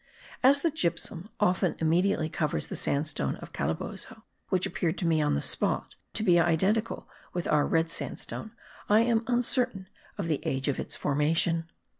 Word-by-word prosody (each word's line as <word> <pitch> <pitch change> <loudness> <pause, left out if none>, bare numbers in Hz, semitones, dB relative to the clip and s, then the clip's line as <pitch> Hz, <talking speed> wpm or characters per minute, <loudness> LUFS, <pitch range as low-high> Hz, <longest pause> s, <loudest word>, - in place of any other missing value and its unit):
As 280 +2 +5
the 335 - +2
gypsum 185 - -2
often 185 -3 +2
immediately 165 +1 +2
covers 155 -1 -1
the - - -6
sandstone 140 - 0
of - - -11
Calabozo, 190 - -4 0.3
which 185 -1 +2
appeared 170 0 -1
to 180 - -1
me, 160 -2 +3
on 150 - +2
the 70 - -1
spot, - - 0 0.2
to 215 - +1
be 175 -5 +5
identical 190 +7 +1 0.3
with 175 -1 -2
our 150 -1 +3
red 165 0 +1
sandstone, 220 - -5 0.4
I 210 +2 +6
am 230 -1 +2
uncertain 245 -5 +1 0.3
of - - -2
the 155 -3 0
age 135 +1 -1
of 140 - 0
its - - -4
formation. 165 +3 +1
170 Hz, 165 wpm, -28 LUFS, 155-215 Hz, 0.4 s, I